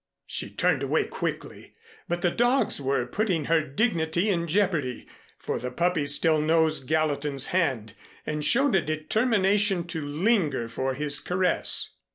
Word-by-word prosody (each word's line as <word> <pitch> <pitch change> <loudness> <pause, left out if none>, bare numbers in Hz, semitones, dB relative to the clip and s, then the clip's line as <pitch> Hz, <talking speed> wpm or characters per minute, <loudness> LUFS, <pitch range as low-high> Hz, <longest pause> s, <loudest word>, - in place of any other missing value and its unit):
She - - -3
turned - - +1
away - - +1
quickly, - - -6 0.3
but 175 0 -3
the 175 - +2
dogs 240 - +1
were 135 -2 0
putting 175 - -1
her 165 +1 +3
dignity 165 - 0
in 170 -3 0
jeopardy 165 - 0 0.3
for - - -4
the 125 - -4
puppy 165 +2 0
still 155 +2 +2
nosed 155 -3 +2
Gallatin's 145 -3 0
hand 130 - 0 0.3
and 150 0 -3
showed 275 - +3
a 190 - +4
determination 195 +3 +1
to 160 -3 -4
linger 150 - 0
for 130 +3 -3
his 145 0 +1
caress. 180 0 -1
160 Hz, 145 wpm, -26 LUFS, 145-185 Hz, 0.3 s, a